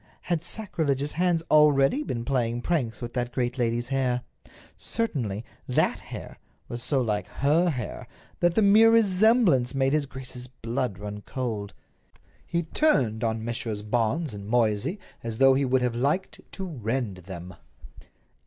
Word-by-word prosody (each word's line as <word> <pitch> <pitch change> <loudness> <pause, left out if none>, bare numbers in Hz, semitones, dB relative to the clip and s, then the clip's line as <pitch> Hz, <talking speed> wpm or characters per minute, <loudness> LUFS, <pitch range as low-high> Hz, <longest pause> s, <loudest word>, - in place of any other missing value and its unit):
Had 170 -3 -1
sacrilegious 150 -8 -1
hands 175 -1 +1
already 150 - +5
been 120 - -4
playing 120 -3 0
pranks 130 -8 -1
with 120 - -5
that 120 -1 -2
great 125 +1 -2
lady's 120 0 0
hair? 130 -2 0 0.5
Certainly, 120 - -3 0.2
that - - +1
hair - - -9 0.3
was 120 - -6
so 135 +2 +1
like 105 -3 -1
her 155 +6 +2
hair 125 -9 -5 0.3
that 175 0 +2
the 220 - +4
mere 215 +3 +7
resemblance 205 - +4
made 135 0 +2
his 150 -2 +1
grace's 130 -2 -8
blood 120 -3 -3
run 105 0 -6
cold. 110 -7 -4 0.7
He 170 0 0
turned 130 - +1
on 110 -1 -1
Messrs. 115 -3 -3
Barnes 120 +6 0
and 100 0 -8
Moysey 115 - +1 0.2
as 115 -1 -5
though 135 +1 +6
he 135 +1 +2
would 130 0 +2
have 125 -1 +1
liked 140 +10 -1
to 190 - -5
rend 120 - -3
them. 90 0 -9
130 Hz, 150 wpm, -26 LUFS, 115-155 Hz, 0.7 s, mere